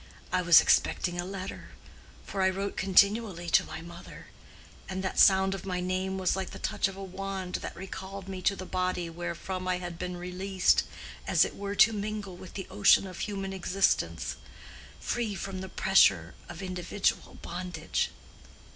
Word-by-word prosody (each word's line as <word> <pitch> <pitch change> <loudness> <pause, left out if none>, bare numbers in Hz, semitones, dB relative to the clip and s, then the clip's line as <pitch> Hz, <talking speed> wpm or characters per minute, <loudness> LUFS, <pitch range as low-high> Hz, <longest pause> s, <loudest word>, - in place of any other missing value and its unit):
"I 185 - +3
was 170 -2 +8
expecting 175 -1 +2
a - - -6
letter; 190 0 -6 0.6
for 195 - -3
I 190 - +4
wrote 195 +2 -3
continually 195 -2 +3
to - - +6
my - - -8
mother. 170 0 -11 0.6
And 190 0 -3
that 190 - -2
sound 190 -1 +6
of 195 -2 -6
my 180 -2 -2
name 185 +1 -1
was 185 -1 +1
like 190 -1 -3
the - - -9
touch - - 0
of 195 - -7
a 195 - -6
wand 190 -1 -4
that - - -6
recalled 190 +1 -7
me 190 -1 -5
to 200 - +2
the 185 - -7
body 180 -2 -2
wherefrom 175 +2 -5
I 185 -1 +1
had 175 -2 -7
been 180 0 -4
released 180 +1 +1 0.4
as - - +5
it - - -7
were 200 0 -4
to 220 +2 +6
mingle 210 -2 -4
with 180 +1 -12
the 190 - -4
ocean 105 - +5
of 185 -2 -8
human 195 -2 -3
existence, 190 +1 0 0.6
free 230 -4 -2
from 190 -1 -5
the 190 - -6
pressure 95 - +4 0.2
of 175 +2 -7
individual 185 +2 -1
bondage. 180 +1 -3
190 Hz, 175 wpm, -29 LUFS, 180-195 Hz, 0.6 s, was